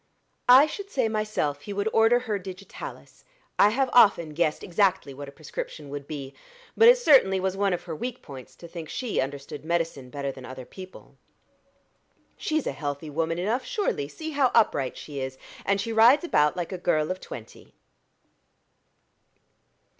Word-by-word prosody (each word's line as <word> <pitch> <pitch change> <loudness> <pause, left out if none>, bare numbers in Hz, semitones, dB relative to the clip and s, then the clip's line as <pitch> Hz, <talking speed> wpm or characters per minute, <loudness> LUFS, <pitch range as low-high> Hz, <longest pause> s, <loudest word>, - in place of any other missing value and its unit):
I 260 +4 +9
should 395 +6 -7
say 260 - 0
myself 215 -10 -2
he 200 - -7
would 200 +1 -1
order 225 +2 +4
her 215 -5 -2
digitalis: 195 - -10 0.4
I 205 - +7
have 265 +5 +1
often 200 -9 +5
guessed 155 -1 0
exactly 185 -5 +1
what 140 +1 -8
a - - -12
prescription 150 0 -7
would 140 0 -7
be. 140 -3 -6 0.4
But 455 - +6
it - - +8
certainly 265 - +5
was 190 0 -1
one 200 0 +1
of 175 - -2
her 165 -3 -6
weak 245 +8 -5
points 135 -3 -11
to 170 - -12
think 165 -2 -8
she 245 -4 -2
understood 140 +2 -6
medicine 165 -5 -2
better 140 +1 -4
than 130 -1 -12
other 130 0 -9
people." 185 +5 -13 1.2
"She's 310 -2 -1
a - - -1
healthy 145 +2 -5
woman 165 +2 -1
enough, 215 +8 -1
surely: 415 - -2
see 315 - -7
how 280 -3 +3
upright 140 - +2
she 145 -2 -7
is, 130 0 -5 0.3
and 200 0 +2
she 225 +3 -3
rides 235 +8 +6
about 150 - +2
like 175 0 -3
a 185 - -5
girl 155 -2 +1
of 185 - -4
twenty." 110 - -11
180 Hz, 170 wpm, -26 LUFS, 145-225 Hz, 1.2 s, I